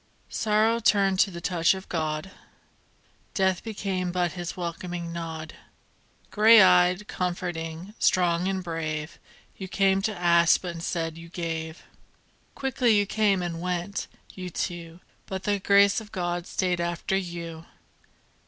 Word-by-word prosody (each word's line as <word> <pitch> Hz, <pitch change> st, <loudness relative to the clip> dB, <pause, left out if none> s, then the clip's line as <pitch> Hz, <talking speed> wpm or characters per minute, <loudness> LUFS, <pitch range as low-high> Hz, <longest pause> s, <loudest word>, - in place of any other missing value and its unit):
Sorrow 220 Hz, +2 st, +2 dB
turned 200 Hz, -4 st, +3 dB
to 200 Hz, -, +5 dB
the 170 Hz, -2 st, -7 dB
touch 170 Hz, 0 st, +2 dB
of 190 Hz, -, -9 dB
God, 155 Hz, +2 st, -3 dB, 1.0 s
Death 190 Hz, -2 st, +1 dB
became 195 Hz, -5 st, -3 dB
but 175 Hz, -1 st, 0 dB
His 175 Hz, -1 st, -6 dB
welcoming 175 Hz, 0 st, -5 dB
nod. 160 Hz, -1 st, -6 dB, 0.8 s
Grey 220 Hz, +1 st, +7 dB
eyed, 180 Hz, +1 st, +5 dB
comforting, 175 Hz, 0 st, -4 dB
strong 175 Hz, 0 st, +2 dB
and 190 Hz, -1 st, -2 dB
brave, 155 Hz, -2 st, -4 dB, 0.4 s
You 190 Hz, -, -6 dB
came 195 Hz, 0 st, +2 dB
to 210 Hz, -1 st, -2 dB
ask 170 Hz, -1 st, +5 dB
but 180 Hz, -2 st, -5 dB
instead 165 Hz, -1 st, -3 dB
you 165 Hz, 0 st, -11 dB, 1.3 s
Quickly 250 Hz, -4 st, +2 dB
you 205 Hz, -, +3 dB
came 200 Hz, -3 st, +1 dB
and 170 Hz, -1 st, -4 dB
went, 180 Hz, +2 st, -3 dB, 0.3 s
you 185 Hz, -1 st, -6 dB
two, 170 Hz, 0 st, -5 dB, 0.3 s
But 190 Hz, -1 st, -5 dB
the 205 Hz, -1 st, 0 dB
Grace 200 Hz, +2 st, +4 dB
of 210 Hz, -1 st, -13 dB
God 175 Hz, -1 st, -3 dB
stayed 180 Hz, -2 st, -1 dB
after 170 Hz, +2 st, -1 dB
you. 170 Hz, -3 st, -5 dB
180 Hz, 135 wpm, -26 LUFS, 170-195 Hz, 1.3 s, Grey